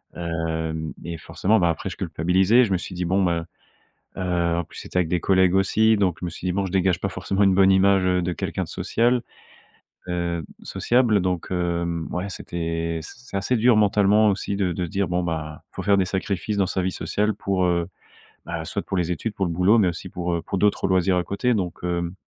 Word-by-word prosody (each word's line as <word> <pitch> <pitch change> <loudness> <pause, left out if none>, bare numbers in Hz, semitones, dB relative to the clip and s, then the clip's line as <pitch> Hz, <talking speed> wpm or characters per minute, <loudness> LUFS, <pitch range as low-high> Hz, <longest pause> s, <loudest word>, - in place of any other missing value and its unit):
Hem, 80 -2 -3
et 85 0 -5
forcément, 105 +6 +1
bah, 85 - +3
après 85 - -2
je - - -8
culpabilisais, 95 +8 +3
je 105 - -1
me 95 - +3
suis 90 - -7
dit 90 - -2
bon, 95 +3 +2
ben, 85 -2 0 0.7
heu, 85 -2 0
en 85 - 0
plus - - -14
c'était - - -6
avec 90 -3 +1
des 90 - +1
collègues 95 +1 +3
aussi, 110 +3 +3
donc 95 -4 +1
je - - -3
me - - -2
suis 85 - -9
dit: - - +1
«Bon, 100 0 0
je 90 - -5
dégage 95 -2 +2
pas 100 - -1
forcément 95 +2 -1
une 95 -1 +4
bonne 95 0 +5
image 95 0 +4
de 90 -1 +1
quelqu'un - - -3
de - - -8
social, 120 +1 +1 0.9
heu, 85 -2 -2 0.2
sociable». 120 -4 +2
Donc, 90 -2 -2
heu, 85 -2 -1
ouais, 90 +3 -2
c'était 85 -2 -3
c - - -10 0.2
c'est - - -4
assez 100 +6 0
dur 120 0 +4
mentalement 105 +1 +4
aussi 100 0 -2
de 95 -3 0
de 90 +2 -2
se - - -8
dire 100 -1 -1
bon, 90 +1 -1
ben, 80 -3 -4
il - - -60
faut - - -4
faire 100 +1 +3
des 95 - +2
sacrifices 100 +2 -2
dans 95 - +2
sa 95 - -1
vie 95 - 0
sociale 105 +3 -1
pour, 95 -2 -1
heu, 85 -1 +1 0.8
soit, 100 +5 -3
bah - - -35
pour 95 - -2
les 90 -1 0
études, 105 +6 -3
pour 95 - -1
le 85 - -2
boulot, 90 +7 +4
mais 100 - +4
aussi 90 +2 -6
pour, 90 0 -3
heu, 85 - -2
pour 100 - -3
d'autres 105 -1 +2
loisirs 95 0 +2
à 90 - +1
côté. 125 +5 0
Donc, 90 -4 -3
heu, 85 0 -2
90 Hz, 230 wpm, -23 LUFS, 85-100 Hz, 0.9 s, bonne